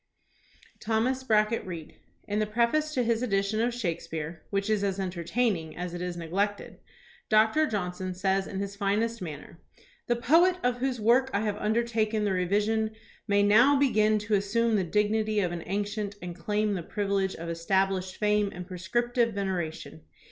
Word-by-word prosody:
THOMAS 245 +4 0
BRACKETT 215 0 +2
REED 170 -4 -7 0.3
In 210 0 -1
the 215 - 0
preface 240 +8 +1
to 250 - +2
his 230 0 +1
edition 205 -2 0
of 240 +1 +1
Shakespeare, 165 -7 -4
which 200 0 -1
is 215 -2 +1
as 195 -1 -1
entertaining 180 -1 -1
as 180 0 -4
it 175 - -5
is 180 -1 -4
neglected, 195 +5 -2 0.5
Doctor 220 +8 +4
Johnson 185 -3 -3
says 190 +1 0
in 190 - -5
his 200 0 -4
finest 215 +3 0
manner: 160 -1 -8 0.5
"The 240 - +2
poet 335 +10 +4
of 245 0 +1
whose 255 -1 -1
work 245 +5 +4
I 200 - +2
have 210 -2 -1
undertaken 220 -1 0
the 205 - +1
revision 210 +4 0 0.3
may 205 0 +3
now 240 +8 +6
begin 215 -6 +3
to 210 - -2
as 200 0 +1
sume 230 0 +2
the 195 - +2
dignity 210 +3 +1
of 180 -4 0
an 175 -1 -4
ancient 205 +1 -2
and 175 -2 -7
claim 210 +4 0
the 185 - -2
privilege 195 +1 -1
of 170 - -7
established 185 +2 0
fame 210 -1 +2
and 180 0 -6
prescriptive 230 +5 -1
veneration. 175 - -3
205 Hz, 170 wpm, -28 LUFS, 185-225 Hz, 0.5 s, now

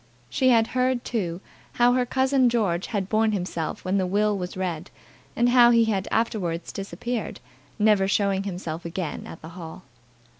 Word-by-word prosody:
She 260 - +2
had 230 -2 +5
heard, 255 -1 +1
too, 180 -6 -3 0.3
how 245 0 +4
her 250 -1 +1
cousin 260 0 +3
George 200 -7 0
had 200 -4 -2
borne 215 +1 +2
himself 175 -4 -3
when 190 +2 +1
the 185 - 0
will 210 +2 +1
was 180 -1 -5
read, 175 -2 -3 0.5
and 240 +1 +3
how 245 -1 +7
he 230 -1 +5
had 195 -4 -1
afterwards 180 -7 -1
disappeared, 200 +5 -5 0.4
never 210 -3 +3
showing 200 -1 +1
himself 175 -4 -5
again 170 -1 -5
at 165 - -11
the 160 - -8
hall. 170 0 -9
200 Hz, 165 wpm, -25 LUFS, 180-235 Hz, 0.5 s, how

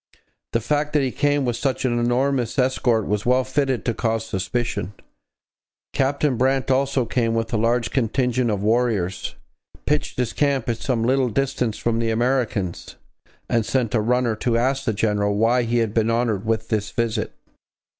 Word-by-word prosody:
The 115 - +2
fact 150 +6 -1
that 150 -2 +3
he 130 - 0
came 145 0 +1
with 120 -1 -1
such 130 +1 -1
a - - +3
numerous 120 +2 0
escort 125 -4 +2
was 105 0 -1
well 125 +1 +3
fitted 130 -1 -1
to 115 - +1
cause 115 0 -1
suspicion. 100 0 -3 1.0
Captain 140 -1 +1
Brant 135 +2 +1
also 135 -1 +1
came 115 -1 0
with 115 0 -2
a - - +2
large 115 +2 +1
contingent 125 0 +1
of 100 -2 -1
warriors, 110 -5 0 0.5
pitched - - -1
his 125 -2 -1
camp 140 -4 0
at 115 - 0
some 115 -2 -1
little 130 +1 +2
distance 125 -2 -1
from 115 -1 0
the 115 -1 0
Americans, 115 -5 -1 0.5
and 115 -2 +1
sent 120 -1 -1
a 110 - +2
runner 120 0 +1
to 115 +1 0
ask 135 +3 0
the 110 - +1
general 105 -1 0
why 115 +4 +3
he 120 0 0
had 115 -3 0
been 110 0 +2
honoured 115 -3 0
with 110 0 -1
this 105 -3 -1
visit. 115 -2 -2
120 Hz, 175 wpm, -22 LUFS, 110-130 Hz, 1.0 s, that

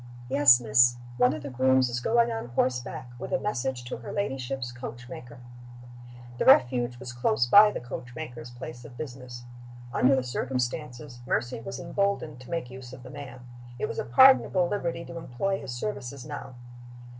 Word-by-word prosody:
"Yes, 135 -2 +7
miss. 120 +1 +4 0.2
One 125 0 +4
of 155 -1 -5
the 140 - -6
grooms 130 0 +3
is 120 0 -2
going 235 - +2
on 225 - -4
horseback, 125 0 -2
with - - -6
a 180 - +2
message 130 -10 -2
to 120 - -6
her 115 - -8
ladyship's 135 -8 -3
coach 125 0 -8
maker." 120 -1 -10 1.0
The - - +1
Refuge 120 -1 +4
was 125 0 -8
close 120 -1 +1
by 205 +11 +8
the - - -4
coach 125 +1 -8
maker's 125 -7 -7
place 120 0 -9
of 120 0 -12
business. 125 -4 -8 0.5
Under 135 +2 +4
the 130 - 0
circumstances, 125 +1 -3
Mercy 120 0 -1
was 115 - -7
emboldened 175 -5 -1
to 125 - -13
make 165 -8 -3
use 130 -1 -10
of 130 -1 -11
the - - -10
man. 140 -3 -9 0.4
It - - -1
was - - -5
a - - -1
pardonable 185 - +5
liberty 170 -4 -3
to 170 - -8
employ 195 +8 -2
his - - -6
services 130 -2 -5
now. 145 -3 -7
125 Hz, 180 wpm, -27 LUFS, 120-150 Hz, 1.0 s, by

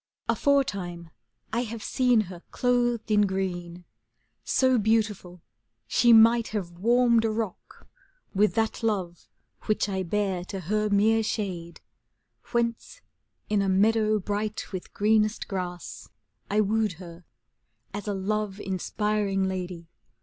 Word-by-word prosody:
Aforetime 195 - 0 0.4
I 235 - +1
have 230 -2 -6
seen 250 -4 +3
her 180 -4 -8
clothed 240 -2 0
in 210 -1 +4
green, 180 -3 -3
^ 180 - -17 0.6
So 260 -2 +3
beautiful, 210 -5 0 0.4
she 240 - +4
might 230 +1 +6
have 195 -5 -4
warmed 235 +2 +4
a 225 - +1
rock 215 -3 -5 0.5
With 210 +2 +2
that 225 +1 0
Love 190 -6 -2 0.4
which 215 - +1
I 190 -2 -2
bear 190 0 -1
to 195 +1 -6
her 210 +5 0
mere 215 +2 +3
shade; 185 -6 -4 0.7
Whence 235 - -2 0.5
in 210 -1 +1
a 195 - 0
meadow 215 +2 +3
bright 210 +2 -3
with 185 - -6
greenest 215 +1 +1
grass, 180 -2 -6 0.4
I 210 +1 +3
wooed 215 0 +1
her, 170 0 -12 0.7
as 205 0 -6
a 205 - -1
love 205 +1 -2
inspiring 200 +1 -1
lady. 180 -3 -5
210 Hz, 130 wpm, -26 LUFS, 190-225 Hz, 0.7 s, might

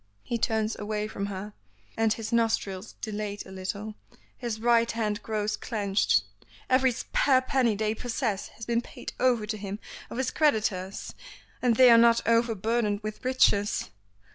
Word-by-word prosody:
He 235 - -2
turns 220 -1 0
away 210 0 -2
from 200 -2 -4
her, 200 +1 -6 0.4
and 225 -1 +2
his 225 +1 -3
nostrils 220 -4 0
dilate 210 -1 -4
a 190 - -12
little; 200 +3 -5 0.4
his 235 -3 -4
right 235 0 +3
hand 215 -2 -2
grows 215 -1 -1
clenched. 200 - +1 0.5
"Every 260 0 +4
spare 260 +2 +2
penny 255 -4 +1
they 215 +1 0
possess 230 -3 -2
has 225 - -10
been 235 0 +1
paid - - -9
over 245 -4 +2
to 215 0 -3
him 200 0 -5 0.3
of - - -7
his 260 0 0
creditors, 210 -10 0 0.5
and 245 -2 +3
they 255 +1 +8
are 230 - +8
not 230 -1 +4
over 230 0 +3
burdened 215 0 0
with 215 0 -6
riches. 210 - +2
220 Hz, 160 wpm, -27 LUFS, 205-235 Hz, 0.5 s, they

